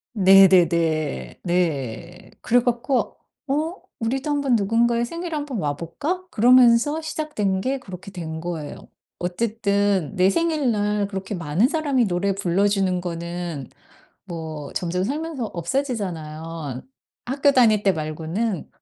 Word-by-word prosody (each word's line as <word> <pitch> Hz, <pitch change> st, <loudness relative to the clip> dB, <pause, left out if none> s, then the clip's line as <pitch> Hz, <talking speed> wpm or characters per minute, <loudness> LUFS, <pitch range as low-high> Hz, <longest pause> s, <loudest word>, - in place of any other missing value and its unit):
네네네. 170 Hz, -, +4 dB
네. 170 Hz, 0 st, -2 dB
그래 245 Hz, +1 st, +3 dB
갖고 245 Hz, +2 st, -1 dB, 0.3 s
'어 305 Hz, +5 st, 0 dB, 0.3 s
우리도 265 Hz, +6 st, -2 dB
1 290 Hz, -1 st, +1 dB
번 265 Hz, -4 st, +2 dB
누군가의 235 Hz, +3 st, +2 dB
생일에 335 Hz, +5 st, -5 dB
1 295 Hz, -1 st, -2 dB
번 265 Hz, -5 st, -4 dB
와 145 Hz, -4 st, -1 dB
볼까?' 300 Hz, -, -4 dB
그러면서 250 Hz, +5 st, +5 dB
시작된 300 Hz, -12 st, -2 dB
게 265 Hz, +5 st, -1 dB
그렇게 190 Hz, -3 st, -10 dB
된 160 Hz, -4 st, -6 dB
거예요. 160 Hz, -3 st, -6 dB, 0.3 s
어쨌든 200 Hz, -2 st, 0 dB
내 185 Hz, 0 st, +4 dB
생일날 215 Hz, -8 st, +1 dB
그렇게 195 Hz, 0 st, -5 dB
많은 170 Hz, +5 st, +1 dB
사람이 290 Hz, -5 st, +1 dB
노래 195 Hz, +1 st, 0 dB
불러주는 195 Hz, 0 st, +1 dB
거는 170 Hz, -4 st, -5 dB, 0.6 s
뭐 160 Hz, -4 st, -7 dB
점점 180 Hz, +1 st, -1 dB
살면서 295 Hz, +2 st, -3 dB
없어지잖아요 165 Hz, -, -4 dB, 0.4 s
학교 275 Hz, +3 st, +2 dB
다닐 220 Hz, -5 st, +4 dB
때 195 Hz, -, +4 dB
말고는. 160 Hz, +6 st, -3 dB
195 Hz, 260 characters per minute, -23 LUFS, 170-250 Hz, 0.6 s, 그러면서